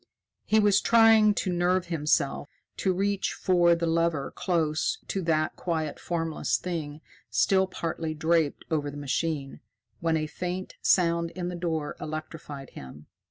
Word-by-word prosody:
He 220 - +3
was 205 -1 +4
trying 225 -2 +6
to 185 -4 -1
nerve 175 +1 +1
himself 150 -4 0 0.3
to 190 - +1
reach 200 +2 0
for 175 -2 +3
the 170 0 -2
lever 165 -3 0
close 160 -4 0
to 195 - -1
that 155 -2 0
quiet 160 -4 -3
formless 165 -2 -1
thing 155 -4 -5 0.3
still 190 -1 +3
partly 165 -3 -4
draped 160 -1 +1
over 150 -2 0
the 145 - -8
machine, 145 0 -2 0.4
when 165 -1 +1
a 155 - -1
faint 180 +4 -5
sound 170 -2 +3
in 180 -1 -3
the 180 - -5
door 160 -4 -2
electrified 155 -3 -7
him. 70 +3 -11
165 Hz, 145 wpm, -27 LUFS, 155-180 Hz, 0.4 s, trying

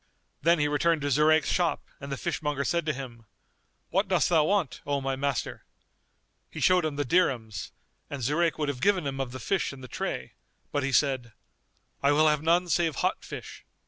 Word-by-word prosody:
Then 170 +1 +4
he 150 -1 +2
returned 150 +1 +1
to 145 - 0
Zurayk's 155 +3 +4
shop 175 -2 +1 0.2
and 140 -1 -8
the 135 - -2
fishmonger 150 -3 -2
said 170 +1 -1
to 155 - +1
him, 120 -5 -9 0.6
"What 195 +3 +2
dost 185 -2 +2
thou 160 -3 +4
want, 190 -7 0
O 140 -1 -1
my 135 0 -2
master?"[FN#245] 140 -1 -2 0.9
He - - -8
showed 180 -2 +4
him 155 -2 -2
the 145 0 -1
dirhams 120 - 0 0.4
and 140 -3 -5
Zurayk 160 +6 +1
would 150 -2 -1
have 130 -3 -4
given 195 -5 +2
him 135 -1 -3
of 130 -2 -4
the 130 - -7
fish 190 - 0
in 140 -1 -11
the 130 - -8
tray, - - -4 0.4
but 145 - 0
he 140 0 -1
said, 130 -5 +1 0.7
"I 140 +1 +4
will 155 +1 +4
have 150 -1 +2
none 170 +3 +2
save 165 -3 +1
hot - - -1
fish." - - -9
145 Hz, 200 wpm, -28 LUFS, 135-170 Hz, 0.9 s, Then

